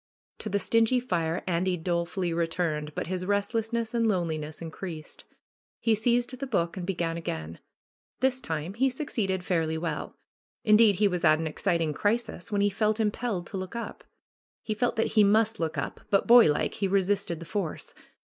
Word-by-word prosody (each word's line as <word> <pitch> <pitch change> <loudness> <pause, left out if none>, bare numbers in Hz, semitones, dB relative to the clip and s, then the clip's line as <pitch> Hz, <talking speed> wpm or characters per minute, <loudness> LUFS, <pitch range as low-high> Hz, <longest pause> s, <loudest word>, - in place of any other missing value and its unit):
To 215 - -4
the 200 - +1
stingy 230 +4 +3
fire 170 -8 -1
Andy 180 +1 0
dolefully 170 +1 -1
returned, 165 -3 -1
but - - -2
his 185 +1 -3
restlessness 225 +3 -1
and 230 -1 +2
loneliness 160 -6 -2
increased. 165 -1 -8 0.5
He 225 - +2
seized 240 +3 +1
the 275 - -3
book 170 -8 0
and 180 -2 -5
began 170 -3 -1
again. 80 - -5 0.6
This 260 0 +1
time 160 - -4
he 265 +5 +2
succeeded 215 -9 -2
fairly 165 -4 0
well. 160 -2 -4 0.5
Indeed 215 -1 +6
he 205 +3 +3
was 180 -2 -2
at 155 -1 +6
an 160 - -3
exciting 165 -1 0
crisis, 215 -1 -1
when 205 -1 +1
he 205 - +4
felt 215 +2 +1
im 215 -2 +2
pelled 210 -7 -3
to 195 - -6
look 185 +3 -6
up. 235 - -6 0.6
He 215 - -2
felt 240 +3 0
that 225 - 0
he 215 -2 +6
must 220 +2 +3
look 160 -2 -2
up, 135 - -3
but 195 - +3
boylike 235 -11 +6
he 195 - -1
resisted 195 -3 +1
the 170 - -8
force. 180 -1 -4
190 Hz, 180 wpm, -28 LUFS, 165-220 Hz, 0.6 s, Indeed